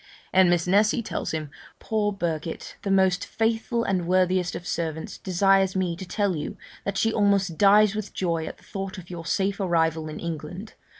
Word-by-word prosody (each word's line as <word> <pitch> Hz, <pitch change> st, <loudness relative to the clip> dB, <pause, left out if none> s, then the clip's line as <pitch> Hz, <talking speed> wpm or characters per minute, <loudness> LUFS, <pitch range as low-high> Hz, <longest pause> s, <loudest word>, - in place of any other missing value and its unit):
And 185 Hz, -1 st, +6 dB
Miss 175 Hz, -1 st, +2 dB
Nessy 210 Hz, +5 st, +3 dB
tells -, -, -3 dB
him, 155 Hz, -2 st, -4 dB, 0.3 s
'Poor 210 Hz, -1 st, 0 dB
Birket, 170 Hz, -5 st, -4 dB
the 200 Hz, -, -3 dB
most 190 Hz, -1 st, +3 dB
faithful 225 Hz, +1 st, 0 dB
and 185 Hz, -5 st, -1 dB
worthiest 185 Hz, 0 st, +2 dB
of 175 Hz, -, -6 dB
servants, 160 Hz, -2 st, -3 dB
desires 195 Hz, +1 st, +3 dB
me 180 Hz, -2 st, 0 dB
to 185 Hz, +2 st, -8 dB
tell 195 Hz, 0 st, 0 dB
you 150 Hz, -, -5 dB, 0.3 s
that 200 Hz, 0 st, -2 dB
she 225 Hz, +2 st, +2 dB
almost 200 Hz, -4 st, +2 dB
dies 205 Hz, 0 st, +6 dB
with 215 Hz, -2 st, -4 dB
joy 165 Hz, -3 st, -1 dB
at -, -, -7 dB
the -, -, -23 dB
thought 195 Hz, -1 st, -6 dB
of 180 Hz, -1 st, -10 dB
your 165 Hz, -2 st, -7 dB
safe 195 Hz, +4 st, 0 dB
arrival 160 Hz, -4 st, +1 dB
in 155 Hz, -, -7 dB
England. 170 Hz, +5 st, -6 dB
185 Hz, 185 wpm, -25 LUFS, 170-200 Hz, 0.3 s, And